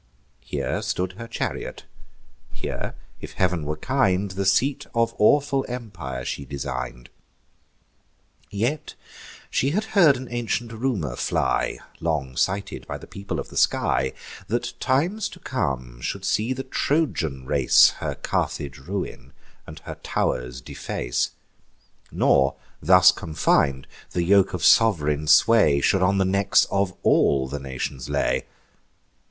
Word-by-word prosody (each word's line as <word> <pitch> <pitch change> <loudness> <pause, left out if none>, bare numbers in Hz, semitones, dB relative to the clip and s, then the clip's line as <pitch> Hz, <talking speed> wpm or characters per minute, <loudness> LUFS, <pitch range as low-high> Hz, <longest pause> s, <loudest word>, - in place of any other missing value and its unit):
Here - - -3
stood 90 0 -2
her 115 +5 -9
chariot; 115 - -4 0.7
here, - - -5 0.2
if - - -9
Heav'n 90 -4 0
were 75 +1 -2
kind, 100 - +1
The 95 +1 -2
seat 130 +8 +2
of 115 0 +2
awful 140 +4 +3
empire 90 - -6
she 70 - -4
design'd. 65 -3 -6 1.4
Yet 120 +9 -2 0.6
she 135 - +1
had 200 +9 0
heard 170 -9 +6
an 130 0 -7
ancient 120 -1 -2
rumour 110 - -2
fly, - - 0 0.2
(Long 75 -6 -2
cited 100 +7 -2
by - - -4
the - - -12
people 100 0 -5
of - - -6
the - - -8
sky,) 65 0 +2 0.3
That - - -2
times 170 +11 0
to 180 - -13
come 65 - -3
should - - -4
see 110 +5 +1
the 130 +1 -3
Trojan 115 - -1
race 70 -2 +5
Her - - -3
Carthage 70 0 -3
ruin, 95 +8 -6 0.3
and - - -9
her - - -8
tow'rs 60 0 -2
deface; - - -3 0.8
Nor 70 0 +3 0.3
thus 90 +3 +7
confin'd, 70 -4 +1 0.3
the 90 - 0
yoke 95 +1 +4
of 90 - -1
sov'reign 75 -9 +4
sway 80 -2 +5
Should 95 +6 +2
on 100 +2 +3
the 95 - +2
necks 100 +1 +3
of 100 -1 +1
all 65 -2 +3
the 70 +2 -5
nations 65 -1 -5
lay. - - 0
95 Hz, 135 wpm, -24 LUFS, 70-115 Hz, 1.4 s, thus